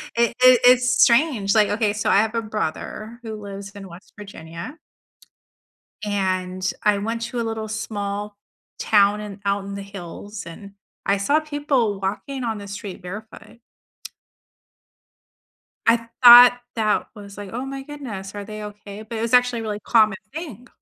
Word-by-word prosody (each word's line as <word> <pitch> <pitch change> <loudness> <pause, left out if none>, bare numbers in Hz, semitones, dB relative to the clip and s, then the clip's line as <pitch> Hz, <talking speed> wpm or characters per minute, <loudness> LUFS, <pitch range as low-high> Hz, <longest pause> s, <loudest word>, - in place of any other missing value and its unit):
It 235 0 +2
it 255 -1 +8
it's 250 0 +5
strange. 235 -6 +4
Like, 210 -2 +4
okay, 210 -1 0
so 210 - -1
I - - +5
have 220 +2 +1
a 230 - +1
brother 215 +2 -5
who 220 -1 -6
lives 200 -1 -8
in 200 -2 -10
West 170 +3 -14
Virginia 195 - -9 1.2
and 185 -2 -1
I 210 -1 +3
went 225 +3 -3
to 235 +1 -4
a 235 - 0
little 220 -1 -4
small 205 -1 -4 0.4
town 205 0 +3
and 205 -1 -8
out 200 0 0
in 200 0 -7
the 200 - -6
hills 195 +1 -9
and 200 +4 -10 0.3
I 200 0 +2
saw 285 +10 +2
people 290 -9 -1
walking 210 +7 -4
on 225 -2 -2
the 200 0 -9
street 200 -1 -7
barefoot. 215 +4 -10 2.3
I 230 0 +3 0.2
thought 245 0 +10 0.2
that 215 -2 0
was, 200 -1 -11
like, 205 -2 -8
"Oh 250 +3 -4
my 270 0 -6
goodness, 245 -10 -8
are 205 -1 -6
they 215 +1 -8
okay?" 210 0 -9
but 225 +1 -7
it - - -3
was 230 +1 -2
actually 245 -1 +4
a - - -5
really 210 -1 -4
common 215 -4 +3 0.2
thing. 275 - -8
210 Hz, 165 wpm, -22 LUFS, 200-235 Hz, 2.3 s, thought